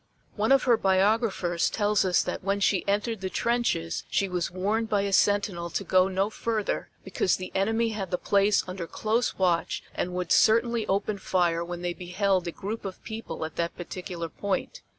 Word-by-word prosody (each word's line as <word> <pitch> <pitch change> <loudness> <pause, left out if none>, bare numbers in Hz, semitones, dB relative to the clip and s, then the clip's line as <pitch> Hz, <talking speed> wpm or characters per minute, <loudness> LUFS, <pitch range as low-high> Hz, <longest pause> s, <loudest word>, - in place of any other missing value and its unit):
One 215 +4 +1
of 275 -1 +5
her 240 -3 +4
biographers 190 -3 +2
tells 210 -1 +1
us 180 -1 +3
that - - -4
when 200 +1 0
she 195 -2 +2
entered 210 +1 0
the 190 - -2
trenches 235 - 0
she 200 - +1
was 180 -2 -2
warned 210 +5 -1
by 205 -2 +2
a 200 0 -2
sentinel 195 -4 +2
to - - -2
go 185 0 +4
no 195 +2 0
further, 220 -1 -2
because 190 -1 +1
the 185 - -7
enemy 225 +4 +1
had 205 -4 -4
the 180 - 0
place 200 +2 +2
under 180 -2 -5
close 225 +6 0
watch 175 -3 +1
and 180 0 -3
would 180 -2 -3
certainly 230 0 +4
open 200 +1 0
fire 170 -3 +1
when 175 0 -6
they 175 0 -1
beheld 185 +1 0
a - - -2
group 210 +6 -5
of 195 -2 -7
people 220 -7 -5
at 160 - -9
that 170 0 -2
particular 175 -1 -5
point. 200 - -3
195 Hz, 190 wpm, -27 LUFS, 180-215 Hz, -, of